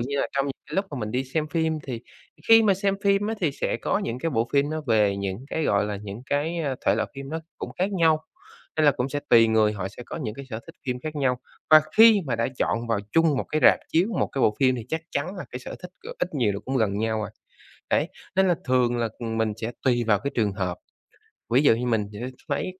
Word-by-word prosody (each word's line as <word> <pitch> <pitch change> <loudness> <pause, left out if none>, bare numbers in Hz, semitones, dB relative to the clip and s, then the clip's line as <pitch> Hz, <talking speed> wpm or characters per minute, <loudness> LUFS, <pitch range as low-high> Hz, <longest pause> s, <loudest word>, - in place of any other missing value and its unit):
như 135 +4 -2
là - - 0
trong 140 0 +1
những 140 - -2
cái - - -8
lúc 195 - +1
mà 145 - -5
mình 105 -2 -3
đi 130 +4 -1
xem 150 +4 -2
phim, 160 -1 0
thì 125 -5 -5 0.5
khi 225 0 +8
mà 205 -3 +4
xem 195 +1 0
phim 200 +1 +3
á 220 - -1
thì 160 -6 +1
sẽ - - -2
có - - 0
những 125 - -3
cái 165 +5 -1
bộ 115 -4 0
phim 140 +1 +2
nó 155 0 -2
về 105 -4 +3
những 100 +4 -4
cái, 160 - -1
gọi 100 -5 +2
là, 105 -1 -3
những 105 +3 -7
cái 150 +5 -1 0.3
thể - - +5
loại - - -1
phim 135 0 -7
nó 160 +3 -3 0.2
cũng - - -5
khác 190 +3 0
nhau, 160 -4 +3 0.5
nên 155 - +3
là - - +8
cũng 125 0 -2
sẽ 145 +1 -3
tùy 115 -1 +7
người 110 -1 +3
họ 95 -3 -4
sẽ 105 - -10
có - - -6
những 120 -10 -4
cái 140 - -8
sở 110 -1 -4
thích - - -12
phim 125 -1 -2
khác 155 +2 -5
nhau. 130 -3 +1 0.3
Và 155 0 +10 0.2
khi 220 -1 +8
mà 125 -3 -1
đã 115 - 0
chọn 115 +1 0
vào 115 -2 +1
chung 165 -3 +4
một - - -1
cái 155 - +1
rạp - - +7
chiếu, 175 +5 +2
một - - +2
cái 135 - -3
bộ 105 - +4
phim 130 -1 +4
thì 115 -2 -7
chắc 160 +3 -2
chắn 165 +8 -3
là 185 - -5
cái 125 - -5
sở 125 - -8
thích 180 - -8
g - - -12
ít 180 - -2
nhiều 120 -7 +2
là 100 - -4
cũng 135 +1 -1
gần 105 -4 +1
nhau 110 0 0
à. 105 - -5 0.6
Đấy, - - +2 0.3
nên 190 0 +4
là 175 - +4
thường 125 -2 +2
là 115 -1 0
mình 110 -2 -1
sẽ 115 +1 -4
tùy 120 -2 +2
vào 105 -3 +4
cái 140 +7 -3
trường 105 -4 +1
hợp. 95 -3 -3 0.7
Ví 125 +4 +4
dụ 125 - +6
như 120 +2 -3
mình 110 -4 +1
sẽ 105 - -8 0.3
lấy 185 +6 -2
130 Hz, 270 wpm, -25 LUFS, 110-160 Hz, 0.7 s, Và